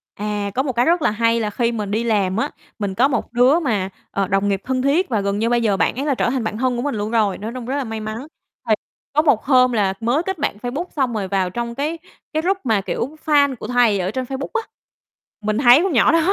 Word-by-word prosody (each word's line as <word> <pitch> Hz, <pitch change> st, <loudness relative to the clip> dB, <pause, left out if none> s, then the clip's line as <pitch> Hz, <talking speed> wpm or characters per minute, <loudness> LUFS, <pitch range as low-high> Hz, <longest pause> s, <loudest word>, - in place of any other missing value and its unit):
À, 205 Hz, -1 st, -3 dB
có 260 Hz, -, +1 dB
một 265 Hz, -, -2 dB
cái 240 Hz, +2 st, +2 dB
rất 340 Hz, +1 st, +3 dB
là -, -, +2 dB
hay 230 Hz, +2 st, +2 dB
là 215 Hz, -2 st, -1 dB
khi 235 Hz, +2 st, 0 dB
mình 210 Hz, -3 st, -4 dB
đi 220 Hz, +3 st, 0 dB
làm 200 Hz, -4 st, +1 dB
á, 230 Hz, -, 0 dB, 0.3 s
mình 200 Hz, -2 st, -2 dB
có 255 Hz, +5 st, +4 dB
một 245 Hz, -4 st, -3 dB
đứa 255 Hz, +7 st, +4 dB
mà, 210 Hz, -, -1 dB, 0.2 s
ờ, 195 Hz, -1 st, -1 dB
đồng 195 Hz, +2 st, +1 dB
nghiệp 195 Hz, -1 st, 0 dB
thân 255 Hz, 0 st, 0 dB
thiết 290 Hz, +7 st, +2 dB
và 220 Hz, -5 st, 0 dB
gần 200 Hz, +1 st, -1 dB
như 230 Hz, +1 st, +1 dB
bây 240 Hz, 0 st, +2 dB
giờ 210 Hz, -4 st, +1 dB
bạn 180 Hz, -, +1 dB
ấy 275 Hz, -, -3 dB
là 285 Hz, -3 st, +1 dB
trở -, -, +1 dB
thành 255 Hz, -1 st, -1 dB
bạn 215 Hz, -1 st, -3 dB
thân 255 Hz, +1 st, 0 dB
của 240 Hz, -, -1 dB
mình 285 Hz, -5 st, -1 dB
luôn 210 Hz, +1 st, -3 dB
rồi, 215 Hz, -4 st, +1 dB
nói 220 Hz, +2 st, -5 dB
chung 250 Hz, -2 st, -6 dB
rất 260 Hz, +3 st, -2 dB
là 280 Hz, -, -1 dB
may 225 Hz, -2 st, -5 dB
mắn, 215 Hz, +6 st, -6 dB, 0.4 s
thì -, -, +6 dB, 0.4 s
có 300 Hz, -, +4 dB
một 285 Hz, -9 st, +2 dB
hôm 255 Hz, -2 st, +4 dB
là 205 Hz, -5 st, +1 dB
mới 245 Hz, +8 st, +1 dB
kết 385 Hz, 0 st, -3 dB
bạn 285 Hz, -7 st, -1 dB
Facebook 250 Hz, -, -4 dB
xong 260 Hz, -5 st, 0 dB
rồi 205 Hz, -3 st, -2 dB
vào 190 Hz, -1 st, 0 dB
trong 235 Hz, +3 st, -4 dB
cái 300 Hz, +5 st, -2 dB, 0.4 s
cái 310 Hz, -, +1 dB
group 375 Hz, +4 st, +1 dB
mà, 220 Hz, -5 st, +1 dB
kiểu, 265 Hz, +9 st, -3 dB
fan 285 Hz, -3 st, +3 dB
của 220 Hz, -, -8 dB
thầy 240 Hz, -5 st, +3 dB
ở 185 Hz, +1 st, -1 dB
trên 255 Hz, +3 st, -3 dB
Facebook 270 Hz, +2 st, -5 dB
á, 465 Hz, -, +1 dB, 0.8 s
mình 215 Hz, 0 st, -1 dB
thấy 245 Hz, +1 st, +7 dB
con 380 Hz, -3 st, 0 dB
nhỏ 240 Hz, -, +5 dB
đó, 330 Hz, -, +4 dB
235 Hz, 275 wpm, -20 LUFS, 210-270 Hz, 0.8 s, thấy